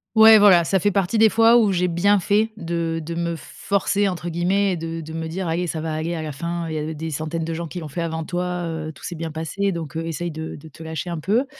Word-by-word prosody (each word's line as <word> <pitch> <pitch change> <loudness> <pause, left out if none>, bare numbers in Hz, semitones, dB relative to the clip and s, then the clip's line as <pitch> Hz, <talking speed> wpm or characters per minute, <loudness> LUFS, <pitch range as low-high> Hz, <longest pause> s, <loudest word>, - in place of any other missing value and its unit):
Ouais 220 0 +9
voilà, 185 -4 +7
ça 190 +3 +1
fait 205 - +2
partie 195 +3 +1
des 220 0 +7
fois 230 +2 +5
où 215 -4 +4
j'ai 180 0 +1
bien 195 +4 +3
fait 210 +4 +2
de 165 -1 -2
de 170 - -4
me 170 0 -2
«forcer» 200 +4 -1
entre 175 -2 -3
guillemets 185 +4 +1
et - - 0
de 165 0 -5
de 160 0 -8
me 160 0 -3
dire: 180 +3 -4
«Allez, 170 +2 -1
ça 160 - -3
va 160 0 -3
aller 160 +2 -2
à 160 - -4
la 155 - -4
fin, 170 +3 -4
il 160 - -4
y - - -2
a 155 +1 -3
des 160 +1 -5
centaines 155 +2 -3
de 165 - -3
gens 170 0 -4
qui 180 - -6
l'ont 160 - -6
fait 160 +4 -4
avant 160 -1 -2
toi, 180 +1 -2
heu, 160 -1 -4
tout - - -17
s'est 175 - -4
bien 165 0 -4
passé, 165 +6 -2
donc 165 -5 -6
heu, 165 0 -3
essaye 170 +2 -3
de 160 +1 -6
de 150 - -12
te 155 - -15
lâcher 160 +2 -5
un 165 - -3
peu». 220 - +1
170 Hz, 285 wpm, -22 LUFS, 160-190 Hz, -, Ouais